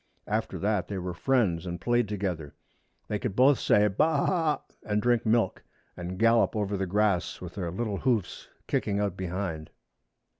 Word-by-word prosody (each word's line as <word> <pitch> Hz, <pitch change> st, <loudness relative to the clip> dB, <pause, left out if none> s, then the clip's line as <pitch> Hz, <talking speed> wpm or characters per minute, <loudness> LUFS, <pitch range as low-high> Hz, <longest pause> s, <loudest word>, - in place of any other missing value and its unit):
After -, -, -2 dB
that 105 Hz, -2 st, 0 dB
they 100 Hz, -, -4 dB
were 90 Hz, -1 st, -4 dB
friends 95 Hz, -4 st, +1 dB
and 85 Hz, 0 st, -4 dB
played 120 Hz, +5 st, +1 dB
together. 90 Hz, -8 st, -3 dB, 0.5 s
They 105 Hz, -, -2 dB
could 105 Hz, -4 st, -3 dB
both 130 Hz, +2 st, +5 dB
say 105 Hz, 0 st, +4 dB
ba 100 Hz, +8 st, +2 dB
a 160 Hz, +1 st, +2 dB, 0.4 s
a, -, -, -7 dB, 0.2 s
and 105 Hz, 0 st, -1 dB
drink 120 Hz, 0 st, +1 dB
milk, 110 Hz, -3 st, +1 dB, 0.3 s
and 90 Hz, +1 st, -6 dB
gallop 115 Hz, +2 st, +3 dB
over 105 Hz, -1 st, -1 dB
the 95 Hz, -1 st, -2 dB
grass, 100 Hz, -1 st, +1 dB
with 90 Hz, -2 st, -8 dB
their 90 Hz, -4 st, -3 dB
little 100 Hz, +3 st, -2 dB
hoofs 115 Hz, -8 st, -1 dB, 0.2 s
kicking 100 Hz, -1 st, 0 dB
out 100 Hz, -3 st, -1 dB
behind. 90 Hz, -4 st, -4 dB
100 Hz, 175 wpm, -28 LUFS, 90-110 Hz, 0.5 s, both